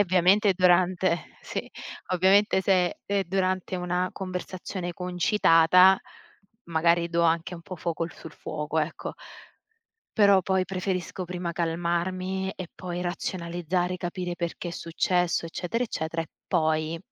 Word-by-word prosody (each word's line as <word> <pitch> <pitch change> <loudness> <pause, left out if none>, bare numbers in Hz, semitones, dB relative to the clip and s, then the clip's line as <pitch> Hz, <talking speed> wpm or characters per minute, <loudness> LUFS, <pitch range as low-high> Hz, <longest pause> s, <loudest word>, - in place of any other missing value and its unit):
ovviamente 190 +2 +4
durante 180 -1 +2
sì, - - -5 0.4
ovviamente 190 +2 +4
se 195 - +2 0.3
è 200 - -2
è - - -2
durante 185 0 -1
una 180 +1 -1
conversazione 185 -1 -5
concitata, 180 0 +5 0.7
magari 170 +1 +2
do 170 0 +1
anche 170 +2 +1
un 170 - -10
po' 185 - -8
fuoco 165 0 -2
sul 160 - -11
fuoco, 150 +1 -4
ecco. 155 +1 -3 1.0
Però 200 -2 +6
poi 190 0 +1
preferisco 185 -1 -3
prima 175 -1 -4
calmarmi 175 +3 -1
e 185 -2 -7
poi 180 -1 -5
razionalizzare, 175 0 -2
capire 175 0 -4
perché 170 +1 -4
è - - -4
successo, 170 +1 0
eccetera, 185 +8 -2
eccetera, 165 -6 -3
e 160 - -12 0.2
poi 160 -1 +1
180 Hz, 125 wpm, -26 LUFS, 170-185 Hz, 1.0 s, Però